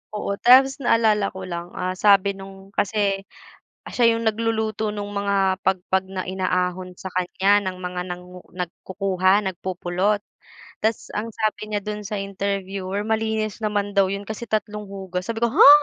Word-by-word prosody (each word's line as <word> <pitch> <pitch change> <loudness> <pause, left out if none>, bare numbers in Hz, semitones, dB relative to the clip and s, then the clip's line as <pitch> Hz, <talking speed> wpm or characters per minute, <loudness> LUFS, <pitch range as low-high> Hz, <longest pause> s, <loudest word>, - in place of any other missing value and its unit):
Oo, 200 -1 -2
tapos 265 +3 +6
naalala 220 -5 +3
ko 190 - -6
lang, 175 -1 -5
ah, 185 0 -1
sabi 200 +1 +4
nung 195 0 -11
kasi, 200 -1 0 0.6
siya 235 -2 +4
yung 230 -1 +1
nagluluto 220 -1 -1
nung 205 -1 -4
mga 195 -2 +2
pagpag 190 0 +1
na 185 -1 -4
inaahon 185 -1 -1
sa 190 - -7
kanya 195 +3 +3
ng 185 -1 -3
mga 180 0 -4
nangu 180 0 -8
nagkukuha, 185 +2 +1
nagpupulot. 185 +2 -1 0.6
Tas 220 0 0
ang 220 +2 -2
sabi 215 -1 -1
niya 205 - +1
do'n 210 0 -4
sa 210 -1 -3
interviewer 195 0 -3
malinis 220 -1 -1
naman 205 -1 0
daw 195 -1 +5
'yon 200 0 -4
kasi 220 +2 -5
tatlong 210 -1 -2
hugassabi 195 +3 -4
ko, 235 - +3
"Ha?" - - +10
200 Hz, 150 wpm, -23 LUFS, 185-215 Hz, 0.6 s, Ha